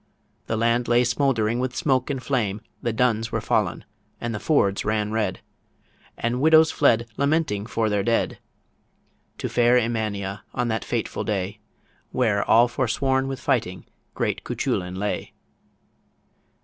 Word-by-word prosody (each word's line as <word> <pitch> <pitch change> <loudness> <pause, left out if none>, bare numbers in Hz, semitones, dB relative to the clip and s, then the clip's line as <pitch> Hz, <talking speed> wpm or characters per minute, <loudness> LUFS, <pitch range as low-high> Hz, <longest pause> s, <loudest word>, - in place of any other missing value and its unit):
The 110 - -1
land 115 +2 +1
lay 120 +1 +4
smouldering 120 -3 +1
with 125 0 -2
smoke 130 -2 +1
and 135 -3 -3
flame; 110 -7 -1 0.2
The 120 - -1
duns 115 -1 +1
were - - 0
fallen - - 0 0.3
and 120 0 -3
the 105 - -3
fords 100 -10 +2
ran 105 0 0
red; 105 -4 -1 0.8
And 120 +2 -1
widows 160 +1 +6
fled, 115 -5 +3
lamenting 140 -8 0
for 115 -2 0
their 105 -1 +1
dead, 115 +3 0 1.0
To - - -3
fair 120 +1 +4
Emania 110 -4 -2
on 120 -1 0
that 110 -1 -1
fateful - - -2
day, 100 0 -2 0.5
Where 110 -5 +1
all 120 +2 +5
forsworn 130 +2 0
with 135 -2 -4
fighting - - -1 0.3
great - - -1
Cuchullin 90 0 -2
lay. 105 +2 -3
115 Hz, 140 wpm, -24 LUFS, 105-125 Hz, 1.0 s, widows